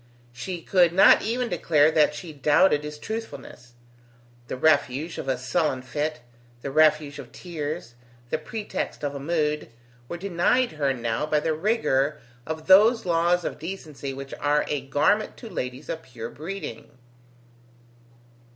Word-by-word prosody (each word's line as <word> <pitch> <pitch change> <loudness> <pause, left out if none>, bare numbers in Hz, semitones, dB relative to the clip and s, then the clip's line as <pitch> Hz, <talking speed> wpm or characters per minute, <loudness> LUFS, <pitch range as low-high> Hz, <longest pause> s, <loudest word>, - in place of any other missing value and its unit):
She 175 +7 -6
could 175 -3 +3
not 190 - +7
even 240 +3 -1
declare 160 -5 +3
that 150 -1 +3
she 165 -1 -8
doubted 150 +2 +3
his 150 0 -6
truthfulness. 205 - -7 0.7
The - - -4
refuge 155 +1 +1
of - - -6
a 130 -1 0
sullen 130 0 -1
fit, 150 +3 -3 0.4
the 140 - -4
refuge 155 -1 +3
of 120 - -10
tears, 155 -6 -6 0.4
the - - 0
pretext 210 -1 -5
of 145 -1 -2
a 140 - -5
mood, 150 -1 -1 0.4
were 175 - -4
denied 200 +7 +1
her 145 -3 0
now 120 +2 -2
by 150 0 +2
the 160 +1 0
rigour 155 - +1 0.3
of 160 0 -5
those 215 +5 +6
laws 175 +1 +2
of - - -4
decency 155 -5 -6
which 135 0 -8
are 145 +1 +2
a 145 -2 -1
garment 145 +10 +1
to 230 - -9
ladies 125 +3 -5
of 160 - -4
pure 120 -4 -8
breeding. 160 - -7
155 Hz, 150 wpm, -25 LUFS, 140-175 Hz, 0.7 s, not